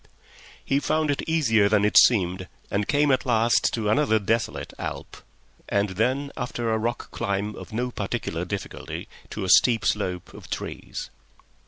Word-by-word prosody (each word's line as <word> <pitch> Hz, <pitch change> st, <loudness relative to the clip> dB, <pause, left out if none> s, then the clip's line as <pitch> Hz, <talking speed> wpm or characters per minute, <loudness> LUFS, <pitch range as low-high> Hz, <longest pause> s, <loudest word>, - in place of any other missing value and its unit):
He 140 Hz, -, +2 dB
found 155 Hz, +1 st, +1 dB
it 140 Hz, -, -1 dB
easier 115 Hz, -11 st, +3 dB
than 105 Hz, -1 st, +3 dB
it 105 Hz, -, 0 dB
seemed, 95 Hz, -5 st, +5 dB, 0.2 s
and 100 Hz, 0 st, 0 dB
came 145 Hz, 0 st, +3 dB
at 130 Hz, -1 st, +2 dB
last 115 Hz, -1 st, +3 dB
to 110 Hz, -3 st, -2 dB
another 110 Hz, 0 st, +3 dB
desolate 110 Hz, +2 st, -1 dB
alp, -, -, -6 dB, 0.5 s
and 100 Hz, 0 st, +1 dB
then 130 Hz, +9 st, 0 dB
after 120 Hz, -2 st, -2 dB
a -, -, +2 dB
rock 120 Hz, +2 st, -3 dB
climb 100 Hz, +2 st, -2 dB
of -, -, -10 dB
no 125 Hz, +3 st, -2 dB
particular 100 Hz, -6 st, -3 dB
difficulty, 95 Hz, +2 st, -6 dB, 0.2 s
to -, -, -5 dB
a 95 Hz, -, -3 dB
steep 115 Hz, +4 st, +5 dB
slope 90 Hz, -4 st, -1 dB
of -, -, -12 dB
trees. -, -, -6 dB
110 Hz, 160 wpm, -25 LUFS, 100-125 Hz, 0.5 s, seemed